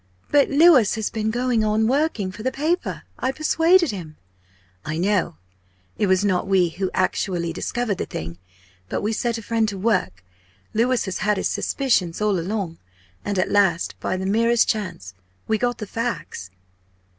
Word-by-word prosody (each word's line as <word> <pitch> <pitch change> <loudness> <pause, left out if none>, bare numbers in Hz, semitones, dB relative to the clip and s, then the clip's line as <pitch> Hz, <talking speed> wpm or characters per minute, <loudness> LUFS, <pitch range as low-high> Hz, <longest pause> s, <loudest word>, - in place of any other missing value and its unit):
"But 290 -1 +4
Louis 285 - +5
has 220 -1 -2
been 220 -1 -1
going 240 -1 +1
on 215 +1 +2
working 260 -8 0
for 215 - -10
the 260 +3 -1
paper 320 +7 -2 0.2
I 260 - 0
persuaded 325 +2 +3
him." 165 -6 -8 0.7
"I 155 +1 -4
know. 185 - +1 0.6
It 205 - 0
was 190 +2 +2
not 190 -2 +1
we 185 -3 +3
who 185 +3 -3
actually 175 -2 0
discovered 220 +2 -2
the - - -3
thing. 85 +2 -6 0.5
But - - -2
we 215 +2 0
set 235 +1 -1
a 225 - -8
friend 225 0 0
to 200 - -6
work. 185 - 0 0.5
Louis 240 +3 +1
has 190 -2 -4
had 210 -1 +1
his - - 0
suspicions 200 -11 0
all 210 -3 +1
along. 180 -2 -3 0.4
And 205 -1 -2
at 185 - 0
last 190 -4 +2
by 185 - -2
the 190 - -4
merest 230 +4 +3
chance 185 - -3 0.3
we 220 -1 +1
got 245 0 0
the 210 - -5
facts." 225 - -4
210 Hz, 170 wpm, -22 LUFS, 185-240 Hz, 0.7 s, Louis